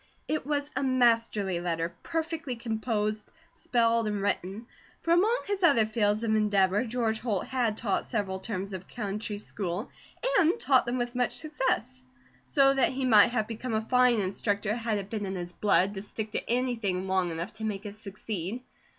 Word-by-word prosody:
It 305 -3 -2
was 290 0 -1
a 260 - 0
masterly 230 -8 +2
letter, 170 -1 -2
perfectly 325 -4 -3
composed, 220 -2 -2 0.2
spelled, 230 -2 +1
and 210 -1 -1
written; 200 +2 -2 0.3
for 335 - +1
among 430 +8 +3
his 405 -1 -2
other 280 -11 +5
fields 215 0 +1
of 220 -1 +1
endeavour, 205 -1 +3
George 225 -2 -1
Holt 210 -6 -1
had 240 -5 0
taught 205 -4 -1
several 195 -5 -2
terms 195 -1 -4
of 185 -1 -7
country 210 -1 -4
school, 200 -1 -4 0.5
and 350 +5 +3
taught 260 - +3
them 245 +1 0
with 240 -1 -2
much 245 -1 -1
success; 265 - -2 0.5
so 275 -1 +4
that 270 -1 +2
he 265 0 -1
might 215 -5 +7
have 235 -3 0
become 230 +1 -4
a - - +3
fine 250 0 +3
instructor, 205 +2 -1
had 230 -2 -1
it 200 0 -6
been 210 -3 -2
in 190 - -3
his 175 -1 -5
blood 200 -1 +3
to 195 - -5
stick 215 +1 -5
to - - -2
anything 225 -7 0
long 190 -2 +1
enough 170 +5 -4
to 220 - -8
make 210 -1 -3
it 205 0 -6
succeed. 210 +1 -5
220 Hz, 180 wpm, -28 LUFS, 200-250 Hz, 0.5 s, might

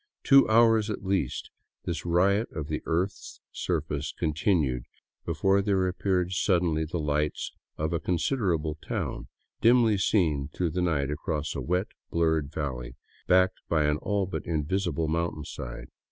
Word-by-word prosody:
Two 135 0 +6
hours, 115 -1 +5
at 105 -2 -4
least, 95 0 -1 0.3
this 85 0 -3
riot 100 +6 +2
of 75 -1 -5
the 75 - -2
earth's 90 +4 -2
surface 75 -3 -2
continued 75 - 0 0.4
before 95 +4 +2
there 95 -2 +1
appeared 90 -1 0
suddenly 85 -4 +1
the 80 +3 -4
lights 75 -1 -1 0.3
of 80 +2 -1
a 85 - +1
con 90 +2 0
siderable 85 - 0
town, - - -4 0.3
dimly 115 -3 +5
seen 80 -9 +1
through 85 0 -1
the 90 +3 -1
night 75 -5 0
across 75 0 -2
a - - -4
wet, 90 +4 0 0.2
blurred 80 -3 +1
valley 65 -5 -4 0.3
backed 90 0 +4
by 80 -2 +3
an 75 0 +2
all 100 +4 -1
but 95 - -4
invisible 85 +1 -1
mountainside. 75 -6 -4
85 Hz, 145 wpm, -28 LUFS, 75-95 Hz, 0.4 s, Two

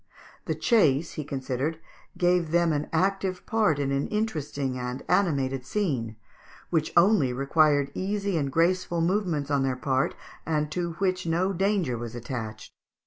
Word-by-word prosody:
The - - -1
chase, 160 - +3
he 155 - -5
considered, 135 +3 -3 0.4
gave 175 -2 +2
them 170 0 +3
an 150 0 -1
active 190 +1 0
part 215 -10 +2
in 140 -1 -1
an 140 0 0
interesting 145 - -2
and 125 +1 -4
animated 140 -8 +1
scene, 135 - -2 0.6
which 160 -3 +1
only 170 - +5
required 145 +1 +2
easy 200 0 -2
and 140 -4 0
graceful 170 +2 +1
movements 170 -5 0
on 140 -1 +2
their 135 -1 0
part, 130 +1 0 0.3
and 150 -1 -1
to 170 0 -2
which 185 0 -1
no 180 +4 +1
danger 185 - 0
was 120 0 -6
attached. 110 -3 -6
155 Hz, 145 wpm, -27 LUFS, 135-185 Hz, 0.6 s, only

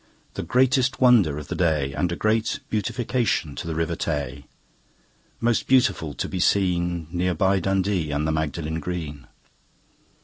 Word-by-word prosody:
The - - -4
greatest 130 +1 +2
wonder 115 - +5
of 75 -1 -7
the - - -4
day, 75 -6 +1
And 90 +4 -1
a - - -1
great 110 +3 0
beautification 115 - -1
to - - -6
the 80 - -3
River 80 +1 -1
Tay, 70 -4 -3 0.9
Most 115 0 +1
beautiful 100 - +2
to - - -3
be 95 - -4
seen, 85 -3 +1
Near 90 0 0
by 95 +3 +2
Dundee 95 -2 0
and 75 +1 -1
the - - +1
Magdalen 80 +1 -2
Green. 75 -6 -5
85 Hz, 150 wpm, -24 LUFS, 80-105 Hz, 0.9 s, wonder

